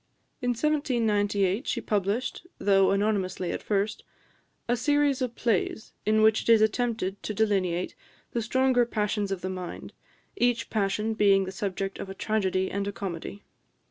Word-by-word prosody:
In 245 Hz, -, 0 dB
1798, 225 Hz, -7 st, +1 dB
she -, -, 0 dB
published, 210 Hz, -, -1 dB
though 195 Hz, -1 st, +4 dB
anonymously 195 Hz, -3 st, 0 dB
at -, -, -4 dB
first, 205 Hz, 0 st, -1 dB, 0.6 s
"A 240 Hz, -, +2 dB
Series 290 Hz, +1 st, +2 dB
of 245 Hz, -2 st, -2 dB
Plays: 220 Hz, -1 st, -1 dB
in 215 Hz, 0 st, +4 dB
which 220 Hz, 0 st, +5 dB
it -, -, -5 dB
is 225 Hz, -, +7 dB
attempted 220 Hz, -3 st, 0 dB
to 210 Hz, -, -4 dB
delineate 190 Hz, -5 st, 0 dB, 0.4 s
the 235 Hz, -, -1 dB
stronger 260 Hz, +2 st, +3 dB
Passions 210 Hz, -3 st, -1 dB
of 190 Hz, -2 st, -2 dB
the 185 Hz, -, -3 dB
Mind, 185 Hz, -1 st, -7 dB, 0.4 s
each 245 Hz, -, +1 dB
Passion 210 Hz, +1 st, 0 dB
being 200 Hz, -2 st, +4 dB
the 190 Hz, -, -5 dB
subject 195 Hz, 0 st, -3 dB
of 195 Hz, -, -6 dB
a 195 Hz, -, -7 dB
Tragedy 190 Hz, -3 st, 0 dB
and 200 Hz, 0 st, -2 dB
a -, -, -1 dB
Comedy." 195 Hz, 0 st, -6 dB
210 Hz, 155 wpm, -27 LUFS, 195-230 Hz, 0.6 s, is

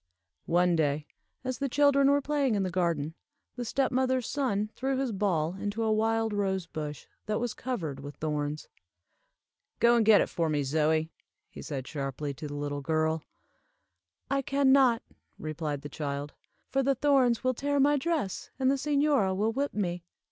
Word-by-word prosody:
One 175 Hz, +1 st, +3 dB
day, 150 Hz, -1 st, 0 dB, 0.4 s
as 255 Hz, -1 st, -3 dB
the 275 Hz, -1 st, -1 dB
children 280 Hz, 0 st, +4 dB
were 285 Hz, 0 st, +3 dB
playing 280 Hz, -5 st, +1 dB
in 200 Hz, -, +1 dB
the 185 Hz, -, -2 dB
garden, 165 Hz, -4 st, 0 dB, 0.4 s
the 245 Hz, -, -4 dB
step 265 Hz, +3 st, 0 dB
mother's 260 Hz, -1 st, +1 dB
son 215 Hz, -7 st, -1 dB
threw 265 Hz, +1 st, -1 dB
his 265 Hz, -2 st, -1 dB
ball 180 Hz, -6 st, 0 dB
into 205 Hz, +3 st, -3 dB
a 220 Hz, -, +2 dB
wild 225 Hz, 0 st, +1 dB
rosebush 180 Hz, -7 st, -3 dB, 0.2 s
that 215 Hz, 0 st, 0 dB
was 240 Hz, -1 st, -2 dB
covered 170 Hz, -, -4 dB
with 145 Hz, +1 st, -8 dB
thorns. 150 Hz, -1 st, -3 dB, 1.1 s
"Go 235 Hz, 0 st, +5 dB
and 235 Hz, -, +4 dB
get 215 Hz, -1 st, +7 dB
it -, -, +2 dB
for 165 Hz, -2 st, -1 dB
me, 145 Hz, -2 st, +1 dB
Zoie," 155 Hz, +3 st, +1 dB, 0.5 s
said 135 Hz, -4 st, -5 dB
he, -, -, -10 dB
sharply, 140 Hz, 0 st, -3 dB
to 150 Hz, +3 st, -7 dB
the 145 Hz, -, -6 dB
little 145 Hz, 0 st, -3 dB
girl. 160 Hz, +2 st, 0 dB, 1.1 s
"I 275 Hz, +1 st, +1 dB
can 275 Hz, 0 st, +2 dB
not," 260 Hz, -4 st, +5 dB, 0.3 s
replied 155 Hz, -2 st, -4 dB
the -, -, -5 dB
child, 145 Hz, 0 st, -4 dB, 0.3 s
"for 270 Hz, -, +1 dB
the 270 Hz, +1 st, +2 dB
thorns 260 Hz, -3 st, +3 dB
will 255 Hz, 0 st, +2 dB
tear 285 Hz, +3 st, 0 dB
my 290 Hz, +2 st, +5 dB
dress, 290 Hz, -, -2 dB
and 265 Hz, 0 st, +3 dB
the 275 Hz, -, +1 dB
señora 280 Hz, -10 st, +2 dB
will 215 Hz, +3 st, +1 dB
whip 280 Hz, +3 st, -2 dB
me." 175 Hz, -4 st, -2 dB
205 Hz, 175 wpm, -29 LUFS, -, 1.1 s, get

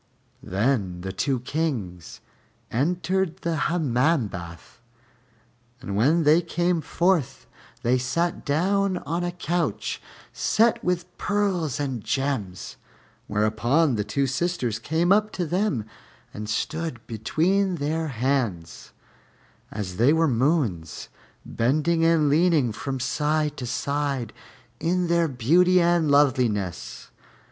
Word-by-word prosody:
Then 100 Hz, -3 st, -1 dB
the 95 Hz, +1 st, -4 dB
two 130 Hz, +3 st, -1 dB
Kings 125 Hz, -, -4 dB, 0.5 s
entered 180 Hz, +6 st, 0 dB
the 170 Hz, -1 st, -1 dB
Hammam 145 Hz, -5 st, +1 dB
bath, 85 Hz, +3 st, -10 dB, 1.0 s
and 100 Hz, -7 st, -5 dB
when 150 Hz, +11 st, +3 dB
they 155 Hz, +3 st, +5 dB
came 175 Hz, 0 st, 0 dB
forth 170 Hz, -1 st, 0 dB, 0.4 s
they 125 Hz, +2 st, +2 dB
sat 170 Hz, +8 st, -1 dB
down 190 Hz, +6 st, +1 dB
on 170 Hz, +2 st, -3 dB
a 175 Hz, -, -1 dB
couch 170 Hz, -, -2 dB, 0.3 s
set 225 Hz, +2 st, +2 dB
with 180 Hz, 0 st, -2 dB
pearls 190 Hz, -, 0 dB
and 130 Hz, -6 st, -3 dB
gems, 130 Hz, -10 st, -3 dB, 0.5 s
whereupon 115 Hz, +8 st, +2 dB
the 105 Hz, -2 st, 0 dB
two 105 Hz, +7 st, -1 dB
sisters 135 Hz, -5 st, -1 dB
came 160 Hz, +8 st, 0 dB
up 210 Hz, +1 st, +4 dB
to 180 Hz, -, -2 dB
them 175 Hz, -, 0 dB, 0.5 s
and 105 Hz, 0 st, -6 dB
stood 150 Hz, +3 st, -3 dB
between 180 Hz, -, 0 dB
their 160 Hz, +1 st, -2 dB
hands, 120 Hz, -, -2 dB, 0.8 s
as 95 Hz, -4 st, -5 dB
they 125 Hz, +7 st, +4 dB
were 160 Hz, 0 st, +3 dB
moons, 120 Hz, -, 0 dB, 0.4 s
bending 155 Hz, +7 st, +1 dB
and 165 Hz, -2 st, +4 dB
leaning 155 Hz, -4 st, +3 dB
from 135 Hz, +4 st, -4 dB
side 150 Hz, +3 st, 0 dB
to 125 Hz, -, -5 dB
side 140 Hz, -2 st, -2 dB, 0.5 s
in 180 Hz, +2 st, 0 dB
their 170 Hz, -1 st, +2 dB
beauty 170 Hz, +8 st, +3 dB
and 170 Hz, -2 st, +2 dB
loveliness. 120 Hz, -, +1 dB
145 Hz, 115 wpm, -25 LUFS, 115-170 Hz, 1.0 s, they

